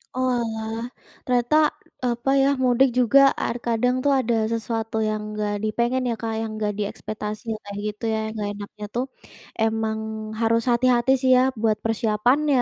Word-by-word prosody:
Oalah. 230 -2 -1 0.4
Ternyata 255 +5 +3 0.3
apa 240 +1 -1
ya 270 - +4 0.2
mudik 255 +1 +4
juga 250 +3 +5 0.2
ar - - -2
kadang 240 +2 +1
tuh 285 - +3
ada 235 -2 +1 0.2
sesuatu 225 -1 -3
yang 215 0 -3
enggak 210 -1 -1
di 215 - +1
pengen 250 +2 +1
ya 235 - 0
Kak 225 -1 -2
yang 225 -1 -3
enggak 210 -1 -1
diekspektasi 210 +1 -5 0.2
kayak 200 0 -7
gitu 210 +2 -22
ya - - 0
enggak 215 -2 -3
enaknya 205 +1 -8
tuh 245 +2 0 0.5
emang 220 0 0 0.4
harus 230 0 +2
hati-hati 245 +1 +3
sih 260 -1 +3
ya - - +5 0.2
buat 220 -2 +2
persiapannya, 245 +5 +2
230 Hz, 155 wpm, -23 LUFS, 215-250 Hz, 0.5 s, juga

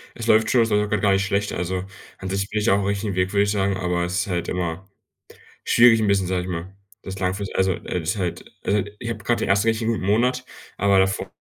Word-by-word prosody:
Es 115 -1 -6
läuft 110 -1 +4
schon, 125 - +4
es 115 - +1
läuft 105 -1 +2
auch - - -7
gerade 105 -2 0
gar 100 -1 +3
nicht 95 0 +1
schlecht. 100 +1 -1
Also, 90 +1 -3 0.3
an 95 - -6
sich 100 +1 -2
bin 105 - -1
ich 105 - +1
auf 100 - +4
dem 100 - -2
richtigen 100 0 -2
Weg, 90 +1 0
würde 100 0 +4
ich 100 - 0
sagen, 100 -1 0
aber 90 -1 -1
es 90 +2 -1
ist - - -4
halt 85 -3 -2
immer 90 +1 -3 0.8
schwierig 115 -1 +6
'n 110 - +1
bisschen, 100 -2 +2
sage 90 -1 -1
ich - - -7
mal, 90 +1 -5 0.3
das 95 0 -7
langfristig 95 +1 -2
also, 95 0 +2
äh, 90 - -4
das 80 - -1
ist - - -4
halt 90 -3 -3 0.2
also, 100 -1 +1 0.2
ich 120 - -5
habe 110 -3 -5
gerade 120 +3 +1
den - - -2
ersten 105 +3 +3
richtig 110 0 +1
guten 110 -5 -1
Monat, 125 +5 +1 0.3
aber 100 0 +3
davor 95 0 0
100 Hz, 270 wpm, -23 LUFS, 95-105 Hz, 0.8 s, schwierig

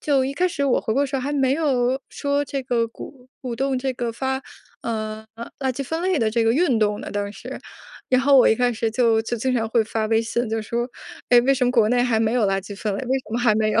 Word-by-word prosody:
就 275 -3 +2
一 270 - -2
开 355 +6 +1
始 285 -6 -2
我 265 - +2
回 220 - -2
国 275 - +3
的 285 - +1
时 275 - -3
候， 260 - -2
还 285 +3 -2
没 270 -2 +2
有 265 -4 +1
说 285 0 -1
这 275 -1 -4
个 240 -2 0
鼓 250 +2 -12
鼓 245 -3 -5
动 270 0 0
这 265 0 -2
个 240 -2 -3
发 265 +2 -2 0.4
呃， 220 -1 -4 0.3
垃 265 -2 -1
圾 270 +3 -4
分 320 +5 -3
类 370 -2 +1
的 225 -2 +1
这 230 +1 +1
个 225 - +3
运 270 -4 +2
动 210 -1 +1
呢， - - -7
当 205 0 -3
时。 250 +6 -8 0.5
然 255 0 +4
后 280 +1 +5
我 260 - +7
一 - - +4
开 245 +1 +1
始 225 0 -1
就 225 -1 +3
就 235 +2 -3
经 255 +3 -1
常 225 -2 0
会 230 0 +3
发 220 0 -2
微 225 0 +2
信， 235 +2 -2
就 225 0 -1
说： 235 +3 -2 0.4
“哎， 245 -1 +8
为 270 +3 +3
什 260 -1 +1
么 245 - +2
国 230 -4 +3
内 245 +1 +3
还 230 -3 +1
没 220 0 +1
有 245 - +2
垃 195 0 +1
圾 200 0 -9
分 210 0 -2
类？ - - -3
为 260 +1 0
什 260 - -13
么 235 - 0
还 235 -3 +3
没 215 0 +1
有？” 225 - +2
245 Hz, 305 characters per minute, -22 LUFS, 225-270 Hz, 0.5 s, 哎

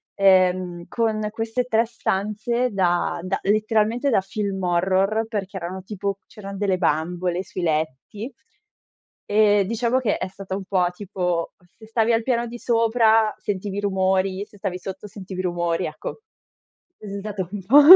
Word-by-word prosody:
ehm, 185 -3 +3
con 220 -2 0
queste 225 +3 -1
3 230 -1 +3
stanze 230 +2 -1
da 175 -3 +1
da 185 +2 -1
letteralmente 215 +5 +2
da 195 - +4
film 195 0 -3
horror, 190 +5 +2
perché 200 -3 -4
erano 185 +1 -5
tipo 200 0 -3
c'eran 200 -2 -8
delle 195 -3 +2
bambole 175 +2 0
sui 185 - -5
letti. 160 - -2 0.9
E 205 -1 +4
diciamo 235 +4 +1
che 225 -5 +1
è - - -3
stata 190 0 -6
un 195 0 -5
po' 185 -2 +2
tipo, 180 -3 -2 0.2
se 220 - -14
stavi 225 +1 +2
al 225 0 +2
piano 235 -1 +1
di 240 +1 -8
sopra 225 -2 +3
sentivi 200 -1 -3
rumori, 190 0 +1
se 210 - -19
stavi 180 -2 -3
sotto 190 +2 -7
sentivi 190 -2 -6
rumori, 175 -1 0
ecco. 155 - -6 0.8
È 210 - -10
s 200 0 -4
stato 195 -3 -4
un 205 -2 -4
po' 275 +9 +8
200 Hz, 155 wpm, -23 LUFS, 185-220 Hz, 0.9 s, po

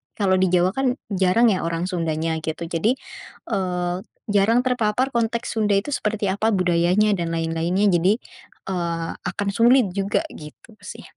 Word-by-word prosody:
kalau 190 -3 +2
di 190 - +3
Jawa 180 +1 +2
kan, 260 +1 0 0.2
jarang 195 +5 +3
ya 185 - -1
orang 165 0 -2
Sundanya, 165 -2 -1
gitu. 160 +1 -4
Jadi, 185 +8 +1 0.6
eee, 180 -4 -1 0.3
jarang 205 +4 +3
terpapar 250 0 0
konteks 235 -1 -2
Sunda 210 -2 +2
itu 200 +9 0
seperti 210 -5 -1
apa, 215 +3 0
budayanya 180 +3 +2
dan 170 -1 -2
lain-lainnya. 165 +5 0
Jadi, 180 +4 +3 0.6
eee, 170 -2 -2
akan 205 -1 -3
sulit 235 0 +4
juga, 195 +1 -1
gitu 155 +8 -13
sih. - - -10
195 Hz, 150 wpm, -22 LUFS, 175-220 Hz, 0.6 s, sulit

